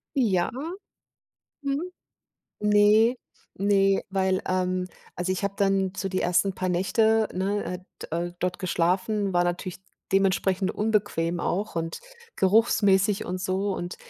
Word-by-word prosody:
Ja. 195 Hz, -9 st, +2 dB, 1.1 s
Mhm. 280 Hz, +3 st, -1 dB, 0.8 s
Ne, 210 Hz, +3 st, +4 dB, 0.4 s
ne, 195 Hz, 0 st, +2 dB
weil, 190 Hz, -1 st, +1 dB
ähm, 185 Hz, 0 st, 0 dB, 0.3 s
also, 180 Hz, +1 st, -1 dB
ich 190 Hz, +2 st, -3 dB
habe 200 Hz, 0 st, -1 dB
dann 195 Hz, -1 st, +1 dB
so 195 Hz, -, -2 dB
die 185 Hz, 0 st, -1 dB
1. 180 Hz, +2 st, +2 dB
paar 185 Hz, -, -2 dB
Nächte, 220 Hz, +5 st, +2 dB
ne, 195 Hz, +3 st, -1 dB
äh, 180 Hz, -, -4 dB, 0.2 s
d -, -, -6 dB, 0.2 s
äh, -, -, -16 dB
dort 180 Hz, 0 st, -1 dB
geschlafen, 185 Hz, +3 st, 0 dB
war 175 Hz, 0 st, +3 dB
natürlich 175 Hz, +1 st, -3 dB, 0.3 s
dementsprechend 190 Hz, 0 st, +2 dB
unbequem 205 Hz, -6 st, 0 dB
auch 195 Hz, +2 st, -2 dB
und 165 Hz, 0 st, -3 dB, 0.4 s
geruchsmäßig 200 Hz, 0 st, +3 dB
und 185 Hz, +1 st, -3 dB
so, 190 Hz, +1 st, -1 dB
und 175 Hz, +1 st, -5 dB
190 Hz, 130 wpm, -26 LUFS, 185-205 Hz, 1.1 s, Ne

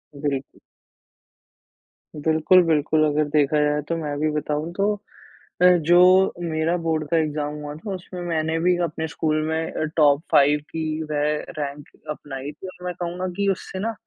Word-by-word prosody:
बिल्कुल। 140 Hz, -2 st, -4 dB, 1.6 s
बिल्कुल, 160 Hz, +4 st, +4 dB
बिल्कुल। 155 Hz, -1 st, +2 dB
अगर 150 Hz, 0 st, +2 dB
देखा 150 Hz, 0 st, +2 dB
जाए 150 Hz, 0 st, +1 dB
तो, 165 Hz, -, 0 dB
मैं 150 Hz, -3 st, -3 dB
भी 155 Hz, +1 st, +1 dB
बताऊँ 150 Hz, +2 st, -2 dB
तो 200 Hz, +2 st, +1 dB, 0.7 s
अ, -, -, +8 dB
जो 170 Hz, +2 st, +3 dB, 0.4 s
मेरा 165 Hz, 0 st, 0 dB
बोर्ड 155 Hz, -2 st, 0 dB
का 165 Hz, -, +2 dB
एग्ज़ाम 150 Hz, -1 st, -1 dB
हुआ 145 Hz, 0 st, -6 dB
था, 190 Hz, +6 st, -6 dB
उसमें 180 Hz, 0 st, -8 dB
मैंने 160 Hz, -1 st, -1 dB
भी 180 Hz, +1 st, +3 dB
अपने 160 Hz, -1 st, -3 dB
स्कूल 155 Hz, 0 st, -1 dB
में 160 Hz, +1 st, -2 dB
अ, -, -, -3 dB
टॉप 145 Hz, -1 st, +5 dB
5 145 Hz, +1 st, +5 dB
की 160 Hz, -1 st, -3 dB, 0.3 s
रे 145 Hz, -1 st, 0 dB, 0.4 s
रैंक 145 Hz, 0 st, -5 dB, 0.2 s
अपनाई 145 Hz, -1 st, -6 dB
थी, 170 Hz, +6 st, -10 dB
और 180 Hz, -1 st, -11 dB
मैं 180 Hz, -, -2 dB
कहूँगा 175 Hz, +2 st, -3 dB
कि 200 Hz, -, 0 dB
उससे 190 Hz, 0 st, -6 dB
ना, 225 Hz, +3 st, -2 dB
155 Hz, 165 wpm, -23 LUFS, 150-170 Hz, 1.6 s, अ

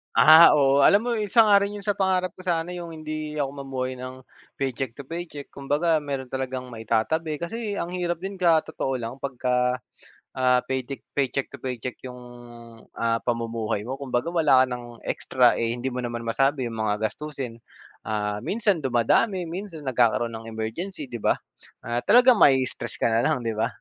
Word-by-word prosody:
Ah, 155 Hz, +8 st, +9 dB
oo, 140 Hz, -1 st, +4 dB
alam 200 Hz, -, +6 dB
mo 235 Hz, 0 st, -1 dB
isa 210 Hz, +2 st, +4 dB
nga 210 Hz, -2 st, +6 dB
rin 200 Hz, +1 st, 0 dB
yun 205 Hz, -, -7 dB
sa 205 Hz, -1 st, -1 dB
pangarap 185 Hz, -1 st, 0 dB
ko 185 Hz, -, -12 dB
sana 170 Hz, -1 st, 0 dB
yung 175 Hz, -2 st, -6 dB
hindi 155 Hz, -1 st, -5 dB
ako 145 Hz, -3 st, -1 dB
mamuhay 135 Hz, -2 st, -5 dB
ng 130 Hz, +1 st, -8 dB, 0.3 s
paycheck 130 Hz, -2 st, -3 dB
to 140 Hz, -, -9 dB
paycheck. 160 Hz, 0 st, -7 dB
Kumbaga 150 Hz, +4 st, 0 dB
meron 140 Hz, -3 st, -4 dB
talagang 130 Hz, -1 st, -4 dB
maitatabi 125 Hz, +8 st, -1 dB
kasi 215 Hz, +4 st, -4 dB
ang 175 Hz, -4 st, -3 dB
hirap 175 Hz, -2 st, -2 dB
din 195 Hz, +1 st, -5 dB
ka 170 Hz, -3 st, +4 dB
totoo 140 Hz, -4 st, -4 dB
lang 120 Hz, 0 st, -4 dB
pag 140 Hz, 0 st, -5 dB
ka, 125 Hz, -1 st, +1 dB, 0.8 s
ah, 125 Hz, -1 st, +3 dB
paytic 130 Hz, +1 st, -3 dB, 0.2 s
paycheck 135 Hz, 0 st, 0 dB
to 140 Hz, -, -10 dB
paycheck 125 Hz, -1 st, -5 dB
yung, 125 Hz, -1 st, -9 dB, 0.7 s
ah, 115 Hz, 0 st, 0 dB
pamumuhay 115 Hz, -3 st, -2 dB
mo. 130 Hz, +5 st, -5 dB
Kumbaga 135 Hz, +3 st, -2 dB
wala 155 Hz, -7 st, +5 dB
ka -, -, +4 dB
ng 120 Hz, -1 st, -8 dB
extra, 125 Hz, -2 st, +2 dB
eh, 115 Hz, 0 st, 0 dB
hindi 125 Hz, +2 st, -3 dB
mo 125 Hz, -, -5 dB
naman 120 Hz, -1 st, -4 dB
masabi 135 Hz, +4 st, +1 dB
yung 115 Hz, -, -7 dB
mga 110 Hz, 0 st, 0 dB
gastusin. 135 Hz, -6 st, -7 dB, 0.5 s
Ah, 105 Hz, -1 st, -2 dB
minsan 205 Hz, -, 0 dB
dumadami, 160 Hz, -, +1 dB
minsan 175 Hz, -3 st, -7 dB
nagkakaroon 120 Hz, -3 st, +1 dB
ng 115 Hz, 0 st, -8 dB
emergency, 125 Hz, -, -5 dB
'di 120 Hz, -, -5 dB
ba? -, -, +2 dB, 0.5 s
Ah, 120 Hz, 0 st, -2 dB
talagang 250 Hz, -1 st, +6 dB
ma-istress 130 Hz, -5 st, +2 dB
ka -, -, +3 dB
na 115 Hz, -, +2 dB
lang, 150 Hz, -6 st, 0 dB
'di 115 Hz, -1 st, -1 dB
ba? 110 Hz, -, +2 dB
135 Hz, 180 wpm, -25 LUFS, 120-165 Hz, 0.8 s, Ah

